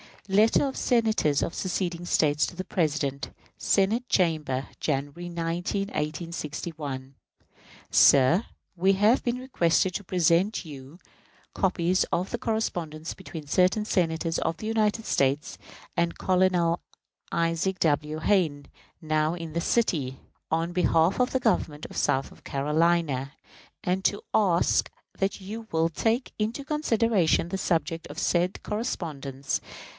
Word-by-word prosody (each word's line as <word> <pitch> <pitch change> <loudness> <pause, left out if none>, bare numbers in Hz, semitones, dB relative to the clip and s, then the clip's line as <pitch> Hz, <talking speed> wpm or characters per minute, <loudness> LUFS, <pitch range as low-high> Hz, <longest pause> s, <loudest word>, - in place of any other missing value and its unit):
_ - - -6
Letter 220 +6 +5
of 270 - -4
Senators 220 - +2
of 170 - -2
seceding 175 -2 -2
States 150 -3 +2
to - - -9
the 185 - -4
President. 155 -6 -1 0.3
Senate 220 +6 +1
Chamber, 155 -7 +1
January 145 +4 -2
19, 175 +4 -2
1861. 150 -4 -4 0.8
Sir: 145 - +6 0.3
We 190 +3 +4
have 210 +6 +3
been 240 -1 0
requested 185 -8 +1
to 205 - -3
present 180 +3 +2
to 165 - -5
you 140 +3 -11 0.5
copies 185 -1 +1
of 180 +6 -2
a - - 0
correspondence 170 -9 -2
between 165 -5 -9
certain 185 +7 +2
Senators 165 -5 0
of 165 - -1
the - - -7
United 220 0 +1
States 140 +2 0 0.4
and 170 0 +1
Colonel 180 -2 +2 0.5
Isaac 165 +3 0
W. 155 0 +1
Hayne, 160 -6 +1 0.3
now 155 0 +1
in 165 -2 -6
this 170 0 -2
city, 150 - 0 0.3
in 165 +2 0
behalf 175 +1 +2
of 250 +1 +2
the 260 - 0
government 155 -10 0
of - - -10
South 135 +1 -1
Carolina, 150 -1 +1 0.5
and 185 +2 -1
to 205 - +1
ask 185 -5 +3 0.3
that 195 +1 -1
you 220 +4 -7
will 165 0 +2
take 225 - 0
into 225 +6 -2
consideration 230 - +1
the 195 - -2
subject 165 -3 -1
of - - -10
said 175 +2 0
correspondence. 140 - -3
170 Hz, 130 wpm, -27 LUFS, 155-195 Hz, 0.8 s, Sir